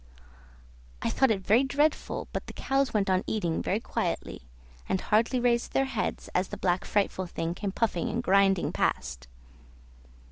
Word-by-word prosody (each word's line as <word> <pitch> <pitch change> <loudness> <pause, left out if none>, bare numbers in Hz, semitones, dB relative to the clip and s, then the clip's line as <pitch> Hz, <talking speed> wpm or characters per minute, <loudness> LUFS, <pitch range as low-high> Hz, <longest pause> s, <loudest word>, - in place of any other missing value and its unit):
I - - +1
thought 265 - +3
it 195 -4 0
very 230 +6 +5
dreadful, 290 +3 0
but - - -4
the - - -8
cows 270 -2 0
went 210 -3 +1
on 185 -1 +2
eating 175 -7 -1
very 205 - 0
quietly, - - -3 0.5
and 190 - +1
hardly 230 +6 +2
raised 240 -1 +1
their 270 - +3
heads 265 -5 -3
as 185 +1 +1
the 205 - -7
black 180 -1 0
frightful 195 -2 0
thing 165 0 -3
came 195 +2 -3
puffing 230 +3 0
and 235 +2 -2
grinding 195 -3 +3
past. 60 +1 -1
210 Hz, 165 wpm, -28 LUFS, 190-240 Hz, 0.5 s, very